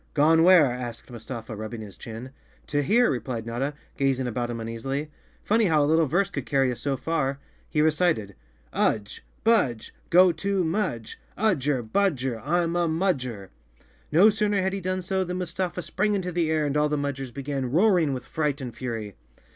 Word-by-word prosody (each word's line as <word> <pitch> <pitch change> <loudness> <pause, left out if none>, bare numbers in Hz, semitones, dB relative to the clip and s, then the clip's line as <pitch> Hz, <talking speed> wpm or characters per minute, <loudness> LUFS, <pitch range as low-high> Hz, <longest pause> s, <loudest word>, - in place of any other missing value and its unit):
"Gone 160 +2 +5
where?" 175 -2 +7
asked 125 -1 -5
Mustafa, 115 -1 -7
rubbing 110 +2 -6
his 105 -3 -10
chin. 120 +3 -8 0.3
"To 145 0 0
here," 235 - +3
replied 120 -2 -3
Notta, 130 +5 -3 0.2
gazing 135 -2 +1
about 120 0 -2
him 120 - -3
uneas¬ 115 0 -6
ily. 140 +3 -3 0.3
"Funny 220 +1 +3
how 155 -5 +3
a - - +3
little 160 +1 +3
verse 185 +7 +1
could 140 -3 -5
carry 135 -3 +2
us 120 - -6
so 140 -2 -1
far. 140 -4 -1 0.3
He 150 - +2
recited: 155 - +1 0.3
" - - -34
Udge! 105 -2 0 0.2
Budge! 170 - +2 0.2
Go 180 +1 +6
to 195 +3 -1
Mudge! 160 - -2 0.2
Udger 145 - +1
budger, 130 - 0
I'm 170 +3 +1
a 175 -1 +2
Mudgerl 135 - -1 0.6
No 185 +8 +6
sooner 210 -1 +1
had 190 0 0
he 195 - -3
done 185 0 -2
so 190 +1 0
than 180 0 -4
Mustafa 180 0 -3
sprang 210 0 0
into 180 -2 -2
the 170 -2 0
air 155 -1 +1
and 145 0 -1
all 150 0 +2
the 150 - 0
Mudgers 140 -2 -3
began 135 -1 -3
roaring 175 - +3
with 130 -2 -4
fright 150 -2 -1
and 125 -4 -6
fury. 115 -5 -5
145 Hz, 185 wpm, -26 LUFS, 125-180 Hz, 0.6 s, where